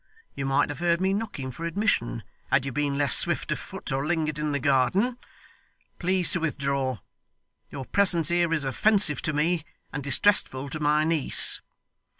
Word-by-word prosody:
You 135 -1 -4
might 135 +1 +2
have 145 0 -6
heard 170 -1 +1
me 190 +1 +1
knocking 200 -11 -4
for 160 - -9
admission, 170 - -1 0.3
had 135 -1 +3
you 135 - -3
been 140 +1 -1
less 145 -1 +3
swift - - +2
of - - -1
foot, - - -8
or 135 +1 -1
lingered 155 -1 -1
in 150 0 -1
the 145 - 0
garden. 145 - +1 0.8
Please 185 0 +1
to 175 - +2
withdraw. 140 -5 -1 0.7
Your 135 - -7
presence 175 -4 +3
here 175 -1 +2
is 160 -3 0
offensive 150 - +2
to 155 - -1
me 155 +2 0 0.3
and 145 0 -4
distressful 140 -2 +1
to 155 - -4
my 150 0 +2
niece. 160 -3 +1
150 Hz, 170 wpm, -26 LUFS, 140-175 Hz, 0.8 s, had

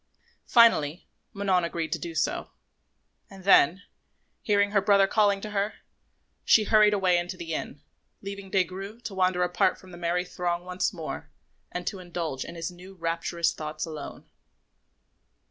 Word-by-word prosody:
Finally, 180 - +4 0.2
Manon 195 -4 +1
agreed 165 -2 -3
to 170 - -1
do 170 -1 -6
so; 160 - -1 0.8
and 195 -1 -13
then, 185 0 +5 0.6
hearing 205 -1 +2
her 200 -1 +3
brother 200 0 +5
calling 200 0 +2
to 215 - -6
her, 205 +1 -1 0.7
she 220 - +5
hurried 210 0 +5
away 185 -3 +3
into 175 +1 -5
the 165 -2 -5
inn, 145 -2 -5 0.4
leaving 200 -1 -7
Des 190 -1 +3
Grieux 195 +5 -8
to 215 - -6
wander 185 -1 +2
apart 180 0 +1
from 185 - -15
the 175 - -10
merry 175 +1 0
throng 175 -1 -3
once 180 0 -1
more - - -6 0.4
and 180 0 -5
to 195 - -3
indulge 170 -6 -4
in - - -9
his 165 +2 -4
new 185 +2 -13
rapturous 170 0 -1
thoughts 155 +1 -5
alone. 155 -3 -8
180 Hz, 160 wpm, -27 LUFS, 170-200 Hz, 0.8 s, then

